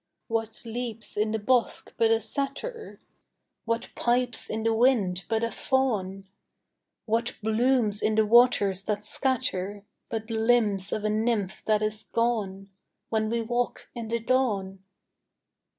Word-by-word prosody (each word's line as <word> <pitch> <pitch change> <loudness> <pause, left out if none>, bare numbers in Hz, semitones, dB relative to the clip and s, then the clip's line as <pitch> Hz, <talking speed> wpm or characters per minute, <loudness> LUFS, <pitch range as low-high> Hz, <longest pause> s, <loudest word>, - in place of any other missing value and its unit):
What 225 0 -3
leaps 230 -1 -4
in 215 +1 +1
the 220 - 0
bosk 235 +2 0
but 225 - +3
a 225 0 +4
satyr? 280 - -4 0.7
What 230 +1 -1
pipes 245 0 0
in 220 0 -2
the 225 0 +2
wind 220 -7 +2
but 225 0 +1
a 230 - 0
faun? 200 -8 -1 0.8
What 230 +2 0
blooms 220 -1 +2
in 215 - +1
the 220 0 +4
waters 210 -4 +4
that 210 -1 -1
scatter 205 -5 -1 0.2
But 225 0 -4
limbs 220 -4 +2
of 215 - -2
a 215 - +1
nymph 215 -2 0
that 215 -1 +2
is 215 0 -1
gone, 200 -5 -1 0.4
When 220 -1 0
we 230 0 0
walk 240 +2 -2
in 235 -2 -5
the 230 +1 0
dawn? 220 -6 0
225 Hz, 140 wpm, -27 LUFS, 210-240 Hz, 0.8 s, a